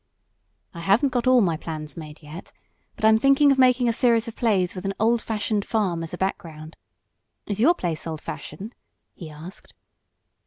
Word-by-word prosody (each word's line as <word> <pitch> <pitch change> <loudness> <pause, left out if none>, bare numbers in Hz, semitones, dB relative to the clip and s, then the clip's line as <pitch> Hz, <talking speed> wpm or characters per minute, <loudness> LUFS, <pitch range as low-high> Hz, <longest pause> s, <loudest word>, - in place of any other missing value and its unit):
"I 170 - -9
haven't 200 - +2
got 245 -1 -1
all 255 -1 +5
my 170 -5 +1
plans 155 -2 -7
made 155 -1 -10
yet, 155 +4 -10 0.4
but 220 - -2
I'm 220 0 +5
thinking 275 +2 +4
of 270 - +1
making 250 -1 +4
a 230 - +2
series 230 -1 +2
of 230 - -7
plays 195 -7 +1
with 185 - -7
an 195 0 -3
old 230 +2 +2
fashioned 210 -1 -2
farm 195 -7 -1
as 165 - -6
a 180 - -6
background. 160 -4 -5 0.7
Is 205 -1 -4
your 320 +10 +4
place 170 - -3
old 160 -1 -5
fashioned?" 205 +8 -8 0.4
he 165 -4 -10
asked. 155 +5 -11
200 Hz, 185 wpm, -24 LUFS, 165-235 Hz, 0.7 s, all